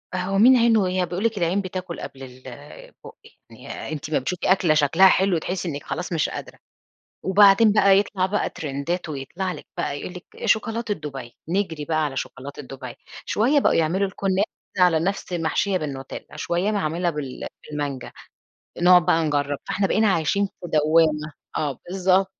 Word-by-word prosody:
هو 185 +2 -1
مين 250 +5 +7
عينه 225 -4 +4
هي 185 0 0
بيقول 180 +3 -4
لِك 225 -2 0
العين 180 +2 +1
بتاكل 185 -2 -6
قبل 135 0 -8
البُق 130 +2 -12 0.3
يعني - - -8
أنتِ 150 -1 -6
أما 155 - +1
بتشوفي 180 +8 -1
أكلة 180 -4 +4
شكلها 155 +5 +5
حلو 190 -1 +3
تحسّي 180 +2 -3
إنِك 145 -2 -5
خلاص 180 0 -4
مش 160 - +1
قادرة. - - -8 0.6
وبعدين 200 +2 +6
بقى 200 -2 +5
يطلع 200 -2 -1
بقى 205 +2 -1
ترندات 155 +4 -4
ويطلع 155 +7 -4
لِك - - -10
بقى 145 -4 -2
يقول 180 - -7
لِك 180 0 -10
شوكولاتة 225 0 +1
دبي 135 -8 -8
نجري 170 -6 -1
بقى 155 -1 +1
على 135 -2 -4
شوكولاتة 140 +2 -6
دبي 130 -2 -9 0.3
شويّة 265 +7 +2
بقوا - - +3
يعملوا 175 +5 +1
الكنافة 195 +1 -1 0.3
على 175 -3 +5
نفس 190 +1 -2
محشية 175 +3 0
بالنوتيلا، 140 -3 -7
شويّة 175 +6 -1
معمولة 175 -3 0
بال 150 -5 -5 0.2
بالمانجا، 145 -3 -4 0.7
نقعد 180 -1 +6
بقى 165 0 +3
نجرّب. 145 -2 0
فاحنا 200 - +1
بقينا 215 +2 +2
عايشين 190 +5 +1
في - - -17 0.2
دوامة. 155 0 +3 0.3
آه 145 -4 -2
بالضب 190 +1 +2
175 Hz, 165 wpm, -23 LUFS, 150-195 Hz, 0.7 s, مين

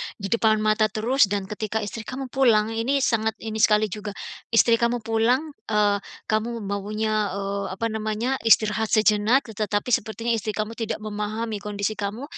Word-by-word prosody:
di 200 -2 -6
depan 220 -2 +3
mata 215 0 +3
terus, 220 +3 +2
dan 200 0 -3
ketika 215 +1 -2
istri 215 +1 -6
kamu 260 0 -6
pulang, 225 -5 +3
ini 255 +5 0
sangat 220 -3 +1
ini 220 -1 -4
sekali 210 -1 +3
juga. 210 0 -6 0.4
Istri 230 0 +5
kamu 235 -1 0
pulang, 235 +7 +1 0.2
eee, 210 -1 +2 0.3
kamu 225 +1 -1
maunya, 210 +2 -1
eee, 200 0 -3
apa 230 +3 -2
namanya, 220 +4 -2
istirahat 220 -1 +3
sejenak, 215 +5 +3
tetapi 210 +2 -2
sepertinya 225 +2 0
istri 215 -2 -1
kamu 215 +2 -4
tidak 225 -1 -3
memahami 215 +1 -3
kondisi 205 0 -2
kamu. 205 +5 -3
215 Hz, 160 wpm, -24 LUFS, 210-230 Hz, 0.4 s, Istri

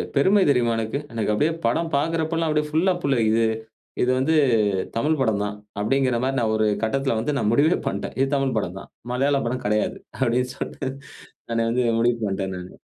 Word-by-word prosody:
பெருமை 190 +8 +4
தெரியுமா 120 -4 +3
எனக்கு. 115 +5 -2
எனக்கு 110 -2 0
அப்டியே 150 +10 +1
படம் 160 +8 0
பார்க்கிறப்ப 160 +2 0
எல்லாம் 165 -1 0
அப்டியே 150 0 +1
ஃபுல்லா 165 +5 +2
புல்லரிக்குது. 115 -4 +2 0.6
இது 125 - +1
வந்து 135 +5 +2 0.6
தமிழ் 150 +6 +1
படம் 110 -5 +1
தான்! 105 0 -3 0.3
அப்டிங்கற 130 +3 +1
மாரி 135 +1 0
நான் 110 -2 +1
ஒரு 110 - +2 0.2
கட்டத்தில 135 +2 0
வந்து 145 +6 -1
நான் 105 -6 +1
முடிவே 150 +8 +4
பண்ணிட்டேன். - - -4
இது 135 - +3
தமிழ் 135 -2 0
படம் 90 -3 -4
தான். - - -14 0.2
மலையாள 140 +2 +2
படம் 125 +2 -2
கெடையாது. 105 +1 0 0.3
அப்டின்னு 125 +2 +1
சொல்ட்டு 135 - -5 0.6
நானே 115 0 +1
வந்து, 125 +2 +1 0.2
முடிவு 120 0 +2
பண்ணிட்டேன் 95 -1 -2
நானு. 90 0 -9
125 Hz, 180 wpm, -23 LUFS, 110-145 Hz, 0.6 s, பெருமை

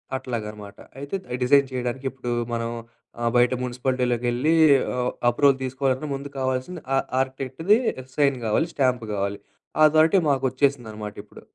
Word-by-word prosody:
అట్లాగనమాట. 105 -6 -6 0.2
అయితే 140 +6 -5
అయ్యి 125 - -3
డిజైన్ 140 +2 +5
చేయడానికి 125 +1 -3
ఇప్పుడు 125 -2 -5 0.2
మనం 115 0 -2 0.5
ఆహ్, 120 - +2
బయట 120 +1 +4
మున్సిపాలిటీలోకెళ్లి 125 +2 0 0.4
ఆహ్, 125 0 0 0.2
అప్రూవల్ 135 +3 +3
తీసుకోవాలన్న 130 +2 -1
ముందు 140 +1 -5
కావాల్సింది 130 +6 -2
ఆ - - +3 0.2
ఆర్కిటెక్ట్‌ది 135 - +1 0.4
సైన్ 140 -2 +3
గావాలి 115 +9 +1
స్టాంప్ 125 -3 +1
గావాలి, 100 0 -2 0.4
అథారిటీ 155 +4 +5
మాకు 135 -2 +1
వచ్చేసిందనమాటిప్పుడు. 110 -6 -3
130 Hz, 125 wpm, -24 LUFS, 120-140 Hz, 0.5 s, డిజైన్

